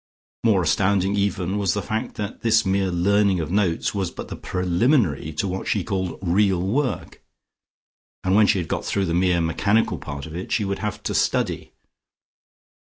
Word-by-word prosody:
More 105 -6 +3
astounding 95 +4 +2
even 100 -1 -1
was 100 -2 +1
the 105 - -1
fact 110 +1 -3
that 105 -1 -5
this 115 -1 +3
mere 95 0 +1
learning 95 +2 +2
of 80 0 -3
notes 100 0 +1
was 95 -4 -1
but - - -8
the - - -5
preliminary 90 - +1
to 100 +5 -1
what 95 +1 -4
she 100 - 0
called 95 -3 -3
"real 95 +1 +2
work." 125 +9 -2 1.0
And 95 - +1
when 105 +1 +5
she - - +3
had 85 -3 -2
got - - -2
through 100 -1 0
the 85 - -2
mere 90 -1 +2
mechanical 100 +4 +1
part 70 -2 -6
of 80 +1 -9
it, 90 - -6
she 105 - +1
would 100 0 -2
have 105 -2 -4
to - - -2
study. - - 0
95 Hz, 180 wpm, -23 LUFS, 90-105 Hz, 1.0 s, when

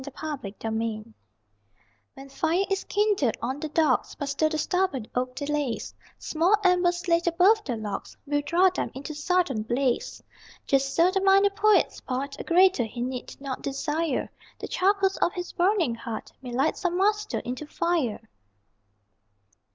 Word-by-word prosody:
THE 280 - -7
POET 270 -9 -7
ON 220 0 -1
THE 225 -1 -1
HEARTH 215 +1 -10 1.1
When 275 0 -11
fire 330 +7 0
is 390 - -1
kindled 410 - +1
on 260 +4 -3
the 310 - -4
dogs, 300 -4 +1
But 285 - -4
still 310 +3 +1
the 310 - -2
stubborn 360 - 0
oak 255 0 -2
delays, 290 -4 -2 0.2
Small 340 +6 +2
embers 355 0 +2
laid 340 0 +2
above 375 +6 +4
the 250 - -3
logs 210 -2 -6
Will 290 0 0
draw 360 +4 +4
them 370 - -3
into 280 +3 -6
sudden 300 - 0
blaze. 250 - -1 0.4
Just 275 0 +1
so 345 +2 +4
the 385 0 0
minor 390 +1 +5
poet's 420 +1 +2
part: 275 +2 -3
(A - - -4
greater 365 -6 +4
he 225 +2 -9
need 250 0 -5
not 275 -2 -5
desire) 295 +2 -1 0.3
The - - -6
charcoals 385 0 +2
of 350 - +1
his 355 -1 -5
burning 355 - +2
heart 230 -1 -6
May 250 -2 -7
light 270 +6 +1
some 360 -2 -1
Master 420 +2 +1
into 255 +5 -5
fire! 295 -11 -1
310 Hz, 165 wpm, -26 LUFS, 260-365 Hz, 1.1 s, minor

